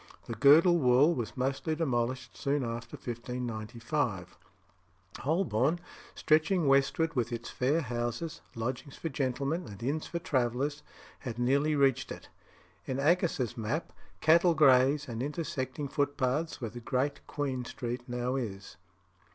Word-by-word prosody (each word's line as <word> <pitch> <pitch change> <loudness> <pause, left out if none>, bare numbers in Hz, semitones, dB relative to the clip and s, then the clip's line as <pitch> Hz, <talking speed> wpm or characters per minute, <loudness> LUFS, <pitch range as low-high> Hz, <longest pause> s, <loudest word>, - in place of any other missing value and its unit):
The 115 - -5
girdle 155 - +6
wall 130 +4 +5
was 120 -3 -4
mostly 135 +5 -1
demolished 130 -4 -1
soon 140 0 0
after 115 0 -5
1595. 120 - -3 0.8
Holborn, 155 - +1 0.4
stretching 160 +3 +2
westward, 140 +4 +3
with 120 -2 0
its 120 0 -5
fair 145 +6 +1
houses, 120 +4 -3
lodgings 125 +4 -4
for 165 - -3
gentlemen, 140 +4 -1
and 100 +1 -9
inns 145 +5 -1
for 170 - -3
travellers, 140 -1 -1 0.4
had 120 -4 -6
nearly 140 +5 +2
reached 135 -3 +2
it. - - -9 0.6
In 130 - -2
Aggas's 145 -6 +1
map, 120 +8 -3 0.3
cattle 170 +2 +5
graze 135 0 +5
amid 115 -1 -4
intersecting 140 -2 -3
footpaths, 145 +2 -1
where 115 -5 -4
Great 130 +4 -2
Queen 135 -4 -2
Street 120 0 -4
now 125 +1 -1
is. 100 -8 -5
130 Hz, 125 wpm, -30 LUFS, 120-150 Hz, 0.8 s, girdle